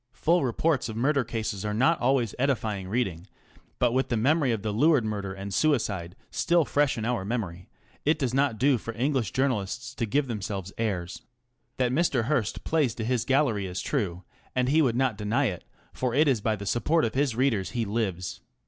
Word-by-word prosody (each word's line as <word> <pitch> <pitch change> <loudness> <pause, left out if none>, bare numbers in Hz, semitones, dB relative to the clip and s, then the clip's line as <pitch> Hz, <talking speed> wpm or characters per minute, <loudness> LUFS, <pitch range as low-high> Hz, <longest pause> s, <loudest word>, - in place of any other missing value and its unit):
Full 165 +6 +2
reports 130 +1 0
of 110 - -5
murder 135 +3 +2
cases 110 -4 -3
are 105 0 -2
not 135 +9 +3
always 125 -3 +2
edifying 110 -8 0
reading, 95 -5 -2 0.5
but 120 - +2
with 130 +2 0
the 120 - +1
memory 140 +3 +2
of 110 -3 -2
the 110 - -1
Luard 145 +1 +4
murder 100 -3 -3
and 95 +1 -6
suicide 100 - 0 0.2
still 170 -2 +2
fresh 145 -2 +1
in 110 - -3
our 120 -4 0
memory 95 -5 -4 0.3
it 155 +2 +2
does 130 -5 -1
not 135 -4 +2
do 130 +1 +3
for 115 +1 -6
English 130 -3 0
journalists 125 -1 -1
to 115 -3 -2
give 140 +7 +1
themselves 100 -5 -4
airs. 95 -6 -2 0.6
That 125 -1 +1
Mr. 140 -4 +2
Hearst 120 -4 -1
plays 150 -8 +1
to 110 - -4
his 125 -1 0
gallery 130 -8 +2
is 90 +1 -4
true, 95 - -2 0.3
and 125 0 +2
he 155 +3 +4
would 125 -6 +2
not 125 -5 +1
deny 110 +7 +1
it, 90 -8 -3 0.3
for 125 -2 -1
it 150 +2 +4
is 130 -6 +2
by 110 +1 +1
the 100 -1 -7
support 150 - +2
of 110 - -2
his 135 -3 +1
readers 115 -7 +1
he 115 - +1
lives. 100 -4 -3
120 Hz, 200 wpm, -27 LUFS, 105-135 Hz, 0.6 s, Luard